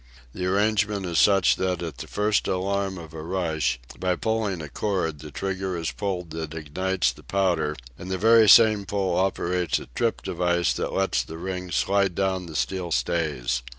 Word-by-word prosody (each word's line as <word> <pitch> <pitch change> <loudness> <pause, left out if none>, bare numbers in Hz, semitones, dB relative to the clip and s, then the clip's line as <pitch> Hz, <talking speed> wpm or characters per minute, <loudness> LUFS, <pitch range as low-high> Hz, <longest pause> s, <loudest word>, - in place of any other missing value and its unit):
The 90 -1 -3
arrangement 105 0 +1
is 85 -3 0
such 95 0 +4
that 90 -2 -1
at 80 -7 -6
the - - -6
first 105 0 +1
alarm 95 +1 -1
of 80 -2 -10
a 80 - -6
rush, 80 -6 -1 0.2
by 90 -1 +1
pulling 110 -3 -1
a 80 - -6
cord 80 -2 -2
the 75 +1 -9
trigger 95 +3 -3
is 80 -4 -2
pulled 90 +5 -4
that 80 -1 -5
ignites 80 -1 -1
the - - -15
powder, 90 -6 0 0.2
and 90 - -7
the 95 - -1
very 110 +2 +6
same 110 -3 +7
pull 100 -2 0
operates 90 -2 0
a - - -7
trip - - -1
device 85 -1 +1
that - - -3
lets 95 0 +1
the 80 - -8
rings 90 -1 -4
slide 95 +8 +2
down 95 -2 -1
the 80 - -9
steel 85 +7 -2
stays. 70 -9 0
90 Hz, 185 wpm, -25 LUFS, 80-95 Hz, 0.2 s, same